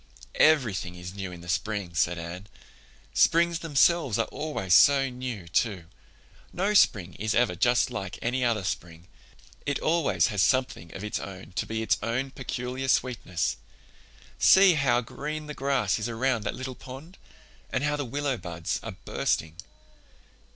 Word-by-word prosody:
"Everything 115 - +3
is 90 +1 -8
new 95 -2 -5
in 85 -1 -10
the 85 - -12
spring," 100 0 -2
said 85 +1 +1
Anne. 85 +4 -7 0.7
"Springs 170 0 +3
themselves 160 - +2
are 115 - +1
always 145 - -2
so 135 +4 +6
new, 125 -7 -6
too. 95 0 0 0.7
No 195 +4 0
spring 95 - +3
is 110 +1 -1
ever 120 +1 +3
just 120 +1 +2
like 95 -5 -5
any 125 +2 -1
other 115 -4 +1
spring. 85 -1 -5 0.6
It 145 - -1
always 165 -5 +2
has 100 - +1
something 125 -9 +1
of 95 - -7
its 105 - -2
own 95 -3 -9
to 90 - -3
be 110 0 -2
its 110 - +1
own 120 +5 -2
peculiar 130 0 -4
sweetness. 120 -10 0 0.8
See 190 -1 +7
how 140 -5 +2
green 150 +6 -6
the 150 - -6
grass 135 -9 0
is 110 - -3
around 115 -1 0
that - - -2
little 130 0 -5
pond, 135 +9 -11 0.5
and 130 - -1
how 150 0 +1
the 145 - -2
willow 140 +1 -2
buds 85 -3 -4
are - - -6
bursting." 80 +1 -1
120 Hz, 160 wpm, -27 LUFS, 95-140 Hz, 0.8 s, See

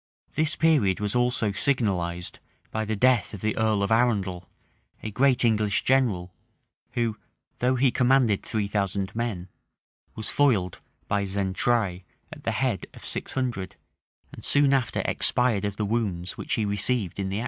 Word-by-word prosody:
This 155 +1 +1
period 145 - +3
was 105 -1 -1
also 120 -3 +1
signalized 90 -6 0 0.3
by 110 0 -2
the 110 +1 -2
death 125 -1 +2
of 95 - -10
the 110 0 -1
earl 110 -2 +1
of 100 - -1
Arundel,[] 100 -7 +1 0.5
a 110 - -4
great 125 +3 +3
English 105 -3 +1
general, 105 -10 +1 0.6
who, 115 -3 -1 0.4
though 125 +1 +2
he 130 0 +3
commanded 125 -5 +3
three 105 -2 -2
thousand 100 -1 -2
men, 110 -6 -3 0.7
was 110 -1 -2
foiled 110 -11 +2 0.3
by 100 -1 0
Xaintrailles 95 0 0 0.3
at - - -13
the - - +1
head - - -1
of - - -10
six - - -2
hundred, 120 -8 -3 0.6
and - - -11
soon 145 -1 +3
after 130 -4 0
expired 115 -5 +1
of 100 -1 -3
the 105 - -1
wounds 100 -5 -2
which - - -2
he 110 - 0
received 100 -1 +1
in 95 -1 -2
the 95 - -3
action. - - -1
110 Hz, 160 wpm, -26 LUFS, 100-125 Hz, 0.7 s, period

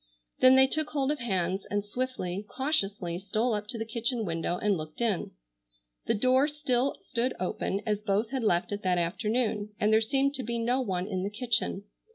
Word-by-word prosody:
Then 255 0 +7
they 265 0 +8
took 310 +3 0
hold 280 -2 0
of 300 - -2
hands 190 -4 -1
and 205 0 -1
swiftly, 205 -5 -3
cautiously, 205 - -1
stole 215 +5 0
up 210 0 -3
to 235 +1 -4
the 225 - -3
kitchen 230 +1 -1
window 165 0 -1
and 205 0 +1
looked 155 -2 -7
in. 225 -6 0 0.8
The - - +2
door 255 +5 +4
still 280 -3 0
stood 245 +2 -1
open 190 +2 -2
as 210 -2 0
both 210 +2 0
had 265 -3 -2
left 180 -3 +1
it 205 0 -3
that 185 -2 +1
afternoon, 210 +3 -1
and 215 +1 +3
there 220 - +5
seemed 270 +4 +2
to 265 - -4
be 235 0 -2
no 245 +3 +1
one 185 -6 -2
in 190 -2 -3
the 195 - -2
kitchen. 215 -3 -1
220 Hz, 200 wpm, -29 LUFS, 195-255 Hz, 0.8 s, they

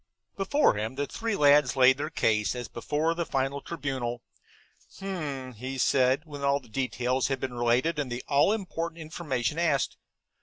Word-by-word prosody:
Before 200 +10 +3
him 110 +4 -3
the 145 - -1
three 225 +6 -3
lads 145 -3 +5
laid 130 0 +6
their - - -2
case, 105 +1 +1
as 120 -1 -5
before 150 +7 -1
the 170 0 -2
final 135 -1 -1
tribunal. 130 -7 -4 0.7
"H'm," 150 -10 -4 0.2
said 130 +2 +3
he, - - -34
when 145 -2 -8
all 140 0 +3
the 130 - -19
details 125 +1 0
had 135 -1 -1
been 130 -1 -4
related 120 +7 +1
and 135 -4 -2
the 120 +1 -4
all 145 +7 +4
important 170 -5 -3
information 155 -3 -2
asked. 155 -6 +1
140 Hz, 165 wpm, -28 LUFS, 125-160 Hz, 0.7 s, laid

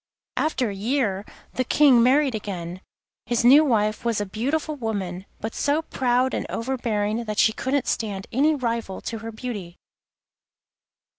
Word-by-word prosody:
After 255 -8 0
a - - -6
year 205 -2 0 0.3
the 255 - 0
King 260 -1 +5
married 265 +2 +4
again. 185 -4 -5 0.5
His 240 -1 +1
new 280 +5 +8
wife 215 -6 +1
was 235 -3 0
a 205 - -1
beautiful 280 +10 -2
woman, 200 -7 -4
but 220 +1 -4
so 295 +3 +1
proud 255 -2 +1
and - - -2
overbearing 230 -3 -1
that 215 -1 -4
she 220 - +4
couldn't 265 +2 -1
stand 200 -4 -2
any 300 +5 +3
rival 230 -7 -3
to 225 - -5
her 225 +1 -6
beauty. 215 -7 -6
230 Hz, 150 wpm, -24 LUFS, 210-260 Hz, 0.5 s, new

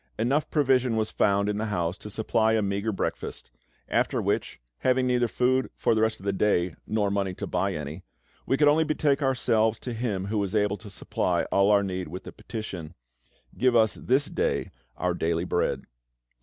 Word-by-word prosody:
Enough 135 +7 +1
provision 130 -5 +2
was 110 -1 0
found 100 0 +2
in 105 0 -1
the 110 +1 -2
house 90 -4 -1
to 105 - -8
supply 110 +1 +1
a 110 -1 +2
meagre 100 +2 -1
breakfast; 95 - -4 0.4
after - - +1
which, - - -1 0.2
having 130 0 +2
neither 125 -1 +2
food 130 +3 +1
for - - +2
the 110 - +1
rest 110 0 +1
of 95 - -12
the 100 - +1
day, 95 -3 +1
nor 105 -2 0
money 100 -2 -1
to - - -4
buy 95 +1 -1
any, 75 +3 -6 0.5
we 135 - +2
could 150 - +4
only 155 +2 +5
betake 150 -2 +1
ourselves 115 -5 +2
to 125 - -6
Him 110 -5 -2
who 105 +1 -1
was 100 +1 -2
able 105 -1 +2
to 105 - -11
supply 95 - -1
all 100 +1 +4
our 100 -1 +5
need 95 -2 -3
with 90 +4 -7
the - - -8
petition, 100 -7 -7 0.6
"Give 125 -1 +2
us 110 -2 +4
this 135 +4 +1
day - - -1 0.3
our - - 0
daily 85 +1 0
bread." 90 - 0
110 Hz, 195 wpm, -27 LUFS, 100-125 Hz, 0.6 s, only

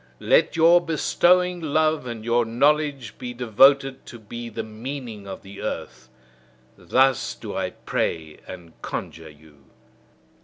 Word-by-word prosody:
Let - - +3
your 165 +2 +6
bestowing 175 +2 +2
love 155 -2 +1
and 115 -2 -7
your 120 +1 +2
knowledge 140 0 0
be 125 -1 -6
devoted 135 +3 +3
to 120 - -9
be 115 +2 -8
the 110 - -5
meaning 110 -2 -7
of 95 - -8
the 100 +1 -11
earth! 65 0 -6 0.7
Thus 130 0 +1
do - - -8
I - - -1
pray 80 -2 -3
and 85 -3 -10
conjure 80 -1 -6
you. 75 -2 -20
120 Hz, 130 wpm, -23 LUFS, 100-145 Hz, 0.7 s, your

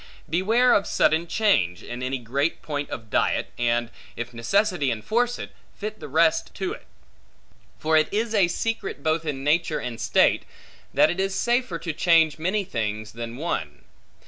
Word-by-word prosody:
Beware 225 +10 +3
of 200 - +2
sudden 160 +2 +2
change, 170 - +1
in 120 +1 -7
any 130 +1 -1
great 135 +6 -2
point 145 -2 -3
of 110 -6 -7
diet, - - +1
and, 120 0 +1 0.2
if 120 +1 -5
necessity 175 - +1
enforce 235 - 0
it, - - -7 0.3
fit 430 - -5
the - - -7
rest - - +2
to 375 +1 -2
it. 470 - -12 0.9
For 160 0 +1
it 155 - +2
is 220 +2 -1
a 200 -5 +4
secret 195 -4 -3
both 160 0 0
in 135 -3 -3
nature 155 +2 +2
and 120 -2 -5
state, - - +3 0.5
that - - +4
it 175 - -4
is 195 0 0
safer 240 -5 +1
to 165 0 -4
change 160 -2 +3
many 190 +6 0
things, 110 - -3
than 115 +1 -6
one. 130 - -4
160 Hz, 170 wpm, -25 LUFS, 120-195 Hz, 0.9 s, a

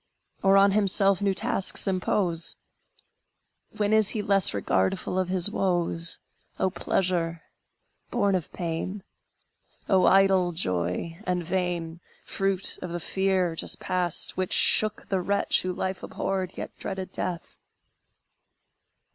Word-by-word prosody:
Or 195 0 +4
on 200 0 +5
himself 195 -1 +2
new 200 -1 +1
tasks 190 - +2
impose? 180 -2 -1 1.2
When 210 0 0
is 220 -2 +4
he 210 - -2
less 195 -1 +7
regardful 100 - -1
of 185 -1 -1
his 185 +1 +4
woes? 175 -4 -1 0.4
O 190 - +1
pleasure, 170 -3 -1 0.7
born 200 -5 +1
of 180 -5 -2
pain! 175 +3 -5 0.8
O 190 -2 +3
idle 190 -2 +4
joy, 90 - -3
and 180 -1 -1
vain, 175 -2 -3 0.3
Fruit 195 -1 -1
of 180 - -6
the 175 +1 -4
fear 190 -1 0
just - - -3
passed, 180 -3 -2
which 185 -1 -2
shook 215 -1 +4
The 190 -2 0
wretch 200 +2 +1
who 185 - -3
life 185 0 -4
abhorred, 190 -2 -4
yet - - -7
dreaded 190 -1 -6
death! 175 -2 -5
185 Hz, 125 wpm, -26 LUFS, 175-195 Hz, 1.2 s, less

